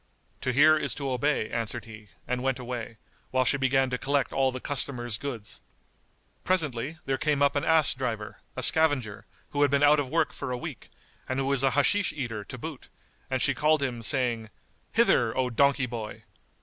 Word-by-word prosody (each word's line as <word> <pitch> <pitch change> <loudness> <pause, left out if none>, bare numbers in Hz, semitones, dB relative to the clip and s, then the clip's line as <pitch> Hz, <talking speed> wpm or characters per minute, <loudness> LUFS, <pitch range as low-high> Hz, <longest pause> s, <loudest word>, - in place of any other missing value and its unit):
"To 130 - 0
hear 155 +4 +5
is - - -2
to 140 -2 -3
obey," 130 -2 0
answered 115 0 -3
he 110 -2 -12 0.2
and 125 0 -1
went 135 -1 0
away, 120 -3 -6 0.3
while 130 0 +1
she 140 - +3
began 135 -1 +2
to 125 - -2
collect 140 -1 0
all 135 -1 +2
the 130 - -6
customers' 120 -5 -2
goods. 120 -6 -7 0.8
Presently, 155 -5 -1
there 135 -1 -1
came 150 -2 +1
up 140 - +3
an 145 - 0
ass 160 -2 +4
driver, 115 -5 -4 0.2
a - - -2
scavenger, 145 -10 +2 0.2
who 145 - -1
had 145 - +5
been 140 +1 +2
out 145 +1 +6
of 140 -3 -2
work 165 +2 +1
for - - -5
a 125 - -2
week - - -8 0.4
and 130 - -1
who 135 - 0
was 135 -1 +2
an 135 -1 +2
Hashish 185 +8 +2
eater 115 -7 -4
to 130 - -8
boot; 150 +1 -8 0.4
and - - 0
she - - +3
called 155 -1 +2
him, 120 -3 -3
saying, 115 -2 +1 0.4
"Hither, 190 - +3
O 130 -1 0
donkey 140 +2 +3
boy!" 115 -3 -7
130 Hz, 195 wpm, -27 LUFS, 120-145 Hz, 0.8 s, out